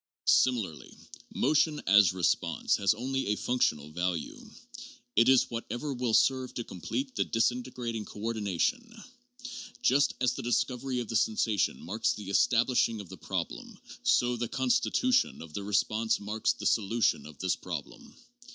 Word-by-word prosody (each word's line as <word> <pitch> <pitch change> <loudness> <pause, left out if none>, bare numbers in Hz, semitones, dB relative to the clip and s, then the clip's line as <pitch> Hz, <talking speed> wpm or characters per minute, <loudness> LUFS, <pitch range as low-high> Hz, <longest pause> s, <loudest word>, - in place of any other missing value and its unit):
Similarly, 100 - +1 0.3
motion, 150 +2 +2
as 100 -1 +6
response, 90 -1 0
has 100 +1 +2
only 135 +4 -2
a 105 - +1
functional 75 - 0
value. 90 0 -3 0.7
It 115 +3 +5
is 130 -1 +4
whatever 120 +4 -4
will 120 -3 0
serve 130 -1 +2
to 120 - -3
complete 265 - -5
the - - +2
disintegrating 120 -1 -2
coordi 110 +1 -4
nation. 230 - -1 0.8
Just 140 +2 +3
as 125 0 +2
the - - -5
discovery 125 +1 -1
of 120 - -6
the 115 - -4
sensation 105 - +1
marks 110 +7 0
the 105 -2 -8
estab 120 +3 +3
lishing 115 -3 +1
of 100 -4 -9
the - - -9
problem, - - -5 0.2
so 120 0 +2
the 120 0 -2
constitution 255 +1 +1
of 80 -2 -11
the 100 - -4
response 110 +2 +1
marks 105 +2 -1
the - - -9
solution 110 -4 +1
of 75 -2 -13
this 95 -1 0
problem. 85 -6 -8
115 Hz, 150 wpm, -29 LUFS, 100-130 Hz, 0.8 s, as